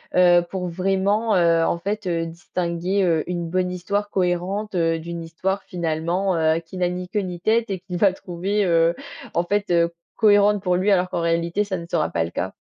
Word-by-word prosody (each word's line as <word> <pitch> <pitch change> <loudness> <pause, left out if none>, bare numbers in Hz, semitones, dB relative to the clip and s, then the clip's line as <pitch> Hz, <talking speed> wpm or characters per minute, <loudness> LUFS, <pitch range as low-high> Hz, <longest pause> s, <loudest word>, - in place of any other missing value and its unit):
heu, 175 -1 +6
pour 185 -2 -3
vraiment, 195 +5 +1
heu, 170 -2 +4
en 170 - 0
fait, 205 +3 -3
heu, 165 -2 -1
distinguer, 175 +3 -2
heu, 165 -4 +2
une 175 -2 -3
bonne 180 0 0
histoire 200 +3 -2
cohérente, 190 +3 -1
heu, 165 -1 +1
d'une 170 +1 -6
histoire 190 +4 -3
finalement, 175 +2 -1
heu, 160 0 +2
qui 165 +2 -11
n'a 180 -1 +1
ni 180 0 -5
queue 210 - 0
ni 180 -2 -5
tête 220 +3 +1
et 190 - -2
qu'il 180 0 -6
va 190 +1 +4
trouver, 190 +3 -2
heu, 165 -1 +3 0.4
en 170 - +1
fait, 205 +1 -1
heu, 170 -1 +3 0.2
cohérente 205 -1 +4
pour 180 -2 +1
lui, 190 +3 +2
alors 180 -2 +2
qu'en 170 - -2
réalité, 170 +3 0
ça 195 -2 -3
ne 170 - -9
sera 160 -4 0
pas 85 - 0
le 85 - -4
cas? 95 +2 -4
180 Hz, 210 wpm, -22 LUFS, 170-195 Hz, 0.4 s, heu